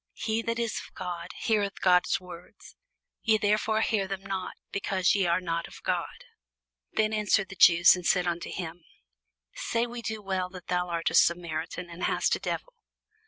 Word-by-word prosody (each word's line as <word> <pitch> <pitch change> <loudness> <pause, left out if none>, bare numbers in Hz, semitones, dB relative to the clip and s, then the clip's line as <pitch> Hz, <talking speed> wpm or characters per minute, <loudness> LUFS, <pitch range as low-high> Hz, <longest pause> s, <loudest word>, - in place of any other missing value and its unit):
He 220 0 -1
that 230 0 -2
is 235 -2 -1
of - - -12
God 175 -2 -5
heareth 205 -3 0
God's 180 -1 +3
words: 180 -1 -13 0.5
ye 220 -1 +3
therefore 215 +1 +1
hear 205 -3 +1
them 195 0 -5
not, 195 -1 -4 0.2
because 190 -2 +1
ye 195 -3 +2
are 170 +1 +2
not 170 -2 -3
of - - -14
God. - - -2 0.7
Then 215 0 +1
answered 210 -2 +2
the 195 - -9
Jews, 170 -1 +7
and 180 - -7
said 180 +1 +2
unto 170 -1 -2
him, 175 -1 -6 0.7
Say 230 0 -1
we 240 0 -7
not 215 -2 -6
well 185 -1 -1
that 185 -1 -12
thou 180 0 0
art 170 -1 -1
a - - -7
Samaritan, 170 0 +1
and 170 +2 -5
hast - - +2
a - - -6
devil? - - -4
185 Hz, 180 wpm, -28 LUFS, 175-215 Hz, 0.7 s, Jews